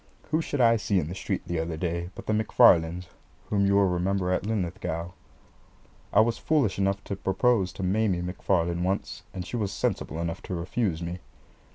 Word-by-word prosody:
Who 160 +1 +2
should 145 - -3
I 115 -1 +5
see 105 -2 0
in 75 -2 -3
the - - -4
street 95 - -3
the 85 -1 -2
other 80 0 -3
day 85 +1 -2
but - - -9
the 110 - 0
McFarlanes, 90 -5 +4 0.5
whom 100 -1 +3
you 100 - +3
will 100 -1 +5
remember 90 +1 0
at 95 - -1
Linlithgow? 90 -4 -2 1.0
I 100 - +4
was 115 +1 +1
foolish 135 -12 +1
enough 100 0 0
to 100 - -4
propose 95 0 +1
to 95 - -6
Maimie 95 -1 +1
McFarlane 90 -1 0
once, 95 +2 -2
and 90 -2 -6
she 120 - -4
was 105 -4 -1
sensible 80 -4 -2
enough 85 -1 -3
to 90 - -5
refuse 85 0 -1
me. 85 +2 -4
95 Hz, 190 wpm, -27 LUFS, 85-105 Hz, 1.0 s, I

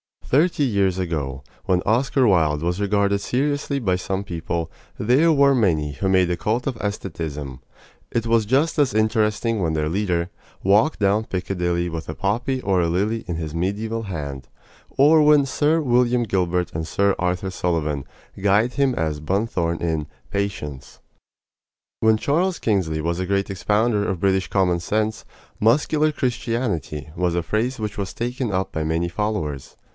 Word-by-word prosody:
Thirty 155 +2 +2
years 100 -7 +1
ago, 75 -7 -3 0.2
when 90 -3 +1
Oscar 130 +4 +2
Wilde 80 -7 +2
was 90 +2 -1
regarded 100 0 +1
seriously 140 +4 -1
by 95 -7 +1
some 95 +1 -3
people, 85 -2 -4 0.3
there 130 +10 +3
were 140 -2 +5
many 80 - +1
who 70 +7 -3
made 95 -2 +3
a 85 - -1
cult 110 +8 -1
of 130 -4 -2
estheticism. 80 -9 -4 0.5
It 115 -1 -1
was 115 -1 +2
just 140 +8 +1
as 140 -4 +3
interesting 110 0 +1
when 80 -3 0
their 75 -1 0
leader 90 -2 -1 0.3
Walked 105 +10 +3
down 105 +2 +2
Piccadilly 90 -2 -1
with 80 -1 -6
a 80 - -4
poppy 125 +6 -1
or 95 -4 +1
a 85 - +1
lily 105 +7 -1
In 85 - -2
his 80 -2 -4
medieval 105 +6 -2
hand, 70 -9 -6 0.4
or 155 +3 +5
when 150 -1 +5
Sir 150 +4 +1
William 125 -2 +2
Gilbert 90 -4 0
and 80 0 -3
Sir 100 +1 +2
Arthur 90 +1 -1
Sullivan 75 -6 -1 0.4
guyed 105 +5 +3
him 135 -2 +1
as 80 -2 -1
Bunthorne 85 -1 -1
in 80 -3 -1 0.2
"Patience." 95 -9 -4 1.0
When 110 0 +4
Charles 170 +10 +1
Kingsley 90 -8 0
was 85 +2 -1
a 95 - -2
great 100 +1 0
expounder 105 +2 +1
of 90 -3 -3
British 95 -2 +2
common 90 -3 +1
sense, 110 +4 -1 0.3
"muscular 150 +7 +3
Christianity" 115 - -2
was 90 -1 0
a 85 - 0
phrase 115 +9 -1
which 105 -1 -4
was 95 -2 -3
taken 120 0 -3
up 95 0 -1
by 80 - -2
many 80 +2 0
followers. 85 -8 -3
100 Hz, 160 wpm, -22 LUFS, 85-115 Hz, 1.0 s, were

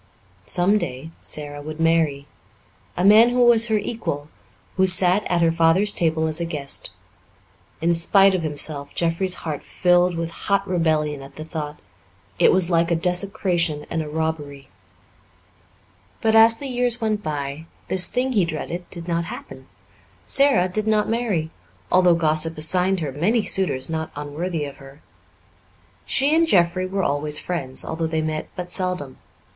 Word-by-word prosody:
Some 195 +4 +2
day 145 -2 -6
Sara 145 -1 -7
would 155 +2 -8
marry 165 -4 +1 0.7
a 180 - 0
man 220 +4 +7
who 245 0 +2
was 235 -1 +5
her 220 -1 +1
equal, 155 -10 -4 0.5
who 190 0 +3
sat 185 +2 +6
at 175 -1 +1
her 165 - +3
father's 165 +5 +3
table 160 -1 0
as 160 +1 -1
a - - -1
guest. 145 -4 -4 0.9
In 170 +1 +2
spite 195 +4 +4
of 185 - -1
himself, 145 -2 -2
Jeffrey's 175 +2 -1
heart 150 -3 -4
filled 180 0 +1
with 165 0 -3
hot 200 +3 -1
rebellion 155 -5 0
at 135 - -13
the 155 - -8
thought; 150 -2 -6 0.6
it - - +5
was 185 -2 +5
like 170 0 +2
a 170 - +2
desecration 175 -3 -1
and 165 - -1
a 150 - -6
robbery. 150 -3 -4 1.5
But, 220 -1 +1
as 225 +1 +6
the 280 - -7
years 245 -1 0
went 215 -2 -1
by, 145 -1 -5 0.2
this 185 -1 +3
thing 255 +1 -1
he 205 -5 +3
dreaded 170 +2 -5
did 170 -1 -7
not 170 -1 -1
happen. - - -10 0.6
Sara 275 -10 +3
did 215 +4 -2
not 215 -1 +1
marry, 210 -9 -1 0.4
although 180 -1 +4
gossip 160 0 +1
assigned 180 +4 +2
her 150 -3 -3
many 205 - 0
suitors 180 -12 +1
not 160 -1 -4
unworthy 150 +3 -4
of 140 - -9
her. 135 +2 -15 1.1
She 275 +3 +2
and 330 0 +3
Jeffrey 185 - +2
were 195 +1 -2
always 150 0 0
friends, 140 -8 -3
although 160 0 -3
they 160 -1 -2
met 155 0 -4
but 180 0 -6
seldom. 180 -9 -2
170 Hz, 160 wpm, -22 LUFS, 155-190 Hz, 1.5 s, man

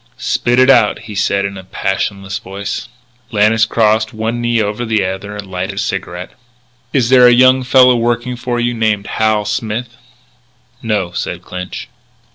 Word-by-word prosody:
"Spit 120 +1 0
it 130 +1 +6
out," 120 -5 +4
he 105 - -9
said 100 0 0
in 100 -1 -5
a - - -10
passionless 95 +1 -3
voice. 100 0 -6 0.4
Lannis 110 0 +3
crossed 110 -1 +1
one 115 +2 -2
knee 120 -1 +1
over 105 +2 -2
the 110 -4 0
other, 100 +2 -5
lighted 95 0 -5
a - - -14
cigarette: 95 -3 -4 0.6
"Is 125 -4 +1
there 125 -1 +7
a - - +7
young 130 +2 +5
fellow 125 0 +5
working 120 +1 -1
for 120 0 -3
you 120 0 0
named 110 -3 0
Hal 110 -1 0
Smith?" 115 +3 -3 0.8
"No," 105 -6 -1
said 90 0 -4
Clinch. 90 0 -7
110 Hz, 160 wpm, -15 LUFS, 100-120 Hz, 0.8 s, there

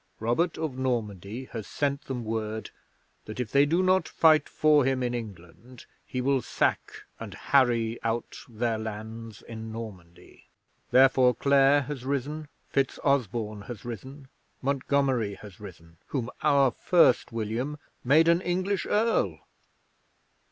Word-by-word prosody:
Robert 120 +10 0
of 155 -5 -4
Normandy 115 -2 -3
has 110 -3 -6
sent 140 0 -2
them 125 -3 -4
word 110 0 -3 0.5
that 110 +3 -8
if 120 -4 -3
they 140 +1 +4
do 170 +5 +2
not 185 0 +3
fight 155 -3 +4
for 150 -2 +4
him 130 0 0
in 120 0 -1
England 110 +2 -9 0.2
he 125 -2 -3
will 135 0 +2
sack - - -1 0.2
and - - -7
harry 120 -4 +2
out 115 0 -3
their 115 -1 -1
lands 110 0 -7
in 110 -1 -8
Normandy. 100 -7 -10 0.4
Therefore 130 -1 +5
Clare 140 +2 +4
has 135 -1 -6
risen, 140 +3 -3 0.3
FitzOsborne 120 -6 0
has 120 -4 -8
risen, 130 +4 -8 0.4
Montgomery 135 -5 0
has 100 +1 -13
risen 85 -5 -12
whom 125 -4 -3
our 140 -3 +4
First 165 -3 +3
William 115 +6 -3 0.3
made 155 +6 +5
an 170 +1 +4
English 185 +2 -1
Earl. 210 - +1
125 Hz, 130 wpm, -27 LUFS, 110-140 Hz, 0.5 s, Therefore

